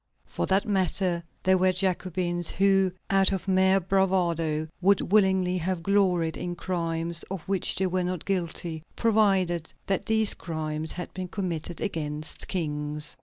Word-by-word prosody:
For - - -3
that 195 +3 +2
matter, 185 -3 +1 0.2
there 185 0 +4
were 185 0 +4
Jacobins 180 -2 -1
who, 195 -1 +3 0.2
out 195 0 +4
of 195 0 -3
mere 190 0 +4
bravado, 170 -5 +1
would 195 -1 +2
willingly 190 -3 +3
have 175 0 -2
gloried 180 -5 +2
in 175 -1 -4
crimes 170 -2 -2
of 190 -2 -4
which 195 -2 +1
they 190 - 0
were 185 0 0
not 180 -2 -3
guilty, 170 -3 -2
provided 195 -7 +2
that 195 -2 0
these 220 -2 +4
crimes 155 -1 -4
had 180 - -6
been 185 -1 -5
committed 175 -3 -4
against 155 -5 -3
kings. 150 -3 -3
180 Hz, 145 wpm, -27 LUFS, 165-190 Hz, 0.2 s, there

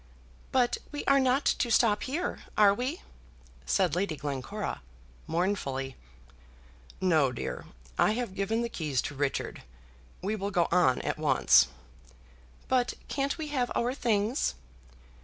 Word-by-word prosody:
"But 250 -2 +2
we 290 - -5
are 275 0 +5
not 260 +2 +2
to 240 - +2
stop 220 -2 +4
here; 315 +8 -2 0.2
are 205 -2 +7
we?" 255 - -3 0.6
said 185 -6 +2
Lady 180 -2 0
Glencora, 145 - -4 0.5
mournfully. 150 -7 -1 1.0
"No, 160 -8 +3
dear; 120 - -5 0.3
I - - +4
have 240 -4 -3
given 215 +4 0
the - - -1
keys 155 - -2
to - - -4
Richard. 140 0 -2 0.6
We 205 +3 0
will 200 -1 -3
go 175 -4 +2
on 155 -8 +3
at - - -2
once." - - +5 1.0
"But 250 -2 +1
can't 280 +2 -1
we 310 -2 -4
have 255 -4 -1
our 245 +2 +1
things?" 225 - 0
205 Hz, 135 wpm, -29 LUFS, 165-250 Hz, 1.0 s, are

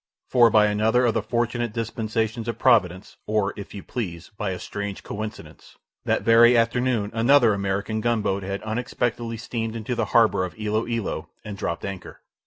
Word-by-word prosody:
For 120 -2 +6
by 105 -1 +5
another 110 +4 +2
of 115 - +2
the - - 0
fortunate 120 -1 -1
dispensations 115 0 -2
of 115 - -3
providence, 100 -7 +2
or 105 -2 0
if 100 0 -9
you 100 - -7
please, 90 -6 -6
by 105 -1 -3
a 95 - -3
strange 100 +1 -6
coincidence, 110 +1 -8 0.3
that - - +1
very 120 +1 +6
afternoon 115 -2 +1
another 115 0 +4
American 100 +2 -2
gunboat 110 -4 0
had 100 +1 -4
unexpectedly 115 +1 -2
steamed 115 0 -4
into 115 +2 -3
the 115 -2 0
harbour 110 -3 +3
of 90 +4 -6
Ilo 110 +1 -1
Ilo 110 -9 -3 0.2
and 105 -2 -6
dropped 85 -4 -4
anchor. 100 -2 -8
110 Hz, 170 wpm, -24 LUFS, 100-115 Hz, 0.3 s, For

